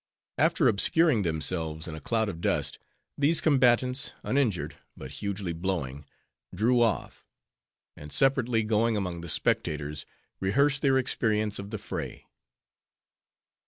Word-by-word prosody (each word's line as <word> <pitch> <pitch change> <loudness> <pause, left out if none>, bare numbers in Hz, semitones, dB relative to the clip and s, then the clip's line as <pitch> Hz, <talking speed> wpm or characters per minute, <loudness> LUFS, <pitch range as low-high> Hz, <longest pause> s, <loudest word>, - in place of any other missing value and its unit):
After - - +3
obscuring 155 +4 +3
themselves 80 -1 -2
in 80 - -6
a 80 - -8
cloud 110 -2 0
of 85 -5 -6
dust, - - -1 0.4
these 150 +4 +4
combatants, 130 -1 +2
uninjured, 125 - 0 0.2
but 65 - -8
hugely 100 -4 -3
blowing, 80 -6 -3 0.5
drew 120 +5 +3
off; 115 -5 0 0.7
and 75 0 -11
separately 125 -4 +2
going 110 +1 +1
among 90 -4 -3
the 85 - -7
spectators, 75 -1 -1 0.3
rehearsed 140 +9 +2
their 135 -2 +3
experience 110 -5 0
of 100 0 -7
the 110 - -4
fray. - - -6
105 Hz, 125 wpm, -28 LUFS, 85-125 Hz, 0.7 s, these